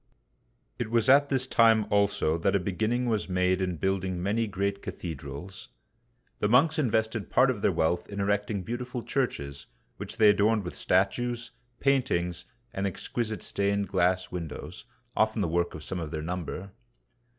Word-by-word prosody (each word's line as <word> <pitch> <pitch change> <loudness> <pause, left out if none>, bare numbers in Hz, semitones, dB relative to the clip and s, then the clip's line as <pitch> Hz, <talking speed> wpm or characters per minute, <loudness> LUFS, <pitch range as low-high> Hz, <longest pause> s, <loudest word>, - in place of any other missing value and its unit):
It 120 - -2
was 115 +2 +2
at 140 +1 +6
this 130 -1 0
time 115 -4 +4
also 100 -6 +2
that 85 - +1
a - - +4
beginning 110 +7 -1
was 110 -4 -1
made 90 0 +1
in 90 -2 -1
building 95 0 -1
many 105 +5 0
great 100 0 -2
cathedrals. 80 +3 -7 0.7
The 105 - +1
monks 155 +8 +4
invested 110 -4 0
part 130 +1 +4
of 110 -5 -5
their - - +3
wealth 85 0 0
in 100 0 -6
erecting 100 0 0
beautiful 120 +2 -4
churches, 70 - -2 0.3
which - - -7
they 105 -2 +7
adorned 105 +1 +2
with 90 - -6
statues, 120 +6 0 0.3
paintings, 120 -11 +1 0.3
and 95 +1 -1
exquisite 110 +4 -3
stained 100 0 -1
glass 90 -1 +1
windows, 85 +1 -6 0.3
often 110 -1 +2
the - - 0
work 85 +1 0
of 75 - -8
some 90 +5 -4
of 80 -3 -4
their 75 0 -4
number. 90 +3 -5
100 Hz, 160 wpm, -28 LUFS, 90-115 Hz, 0.7 s, they